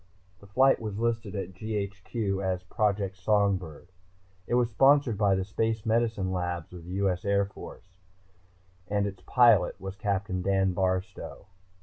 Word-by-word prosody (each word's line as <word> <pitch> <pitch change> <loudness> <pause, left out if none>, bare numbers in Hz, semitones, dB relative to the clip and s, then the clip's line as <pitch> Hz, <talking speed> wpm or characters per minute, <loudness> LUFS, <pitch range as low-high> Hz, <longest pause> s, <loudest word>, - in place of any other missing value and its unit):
The 100 - -16
flight 130 +7 +3
was 105 -3 -4
listed 115 -2 -1
at 95 -2 -4
GHQ 100 0 -3
as 90 -1 -1
Project 100 -1 -1
Songbird. 95 -5 0 0.6
It 120 - +1
was 120 -1 +2
sponsored 135 0 +4
by 100 -1 +3
the 95 0 -1
Space 110 +2 -1
Medicine 110 -4 +1
Labs 90 -2 -3
of 85 -2 -10
the 90 - -7
U.S. 95 -2 0
Air 100 0 +2
Force. 95 -1 -12 0.9
And 100 0 0
its 95 -2 -6
pilot 115 -8 +4
was 95 0 -6
Captain 100 -2 -2
Dan 95 0 +1
Barstow. 95 0 -2
100 Hz, 145 wpm, -28 LUFS, 95-110 Hz, 0.9 s, sponsored